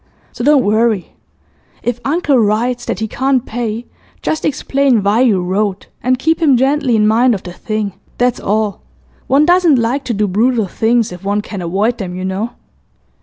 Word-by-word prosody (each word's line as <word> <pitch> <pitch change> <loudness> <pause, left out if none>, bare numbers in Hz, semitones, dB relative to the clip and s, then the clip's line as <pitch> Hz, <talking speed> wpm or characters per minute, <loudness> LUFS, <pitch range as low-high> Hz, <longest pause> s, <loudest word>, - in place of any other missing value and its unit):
So 240 - -6
don't 285 -1 +4
worry. 215 -2 +1 0.7
If 240 0 -2
uncle 290 -2 +1
writes 235 +3 0
that 195 - -3
he 220 - -1
can't 260 +2 0
pay, 230 0 -4 0.4
just 315 - -1
explain 275 -5 +1
why 205 +4 +2
you 225 -7 +3
wrote, 195 +2 -2
and 255 +1 +1
keep 320 +5 0
him 285 -6 +4
gently 265 -1 +2
in 210 -1 +3
mind 235 +2 +3
of 190 - -7
the 175 - -8
thing, 215 0 -3 0.2
that's 245 -1 +1
all. 210 0 -1 0.5
One 280 +3 +4
doesn't 350 -4 +4
like 245 +4 0
to 240 - -1
do 210 +1 +1
brutal 225 +4 +1
things 225 +3 0
if 180 +1 -10
one 205 +1 0
can 205 -2 -7
avoid 200 +8 -1
them, 180 -3 -5
you 185 +1 -4
know. 200 +6 -3
230 Hz, 180 wpm, -16 LUFS, 205-260 Hz, 0.7 s, don't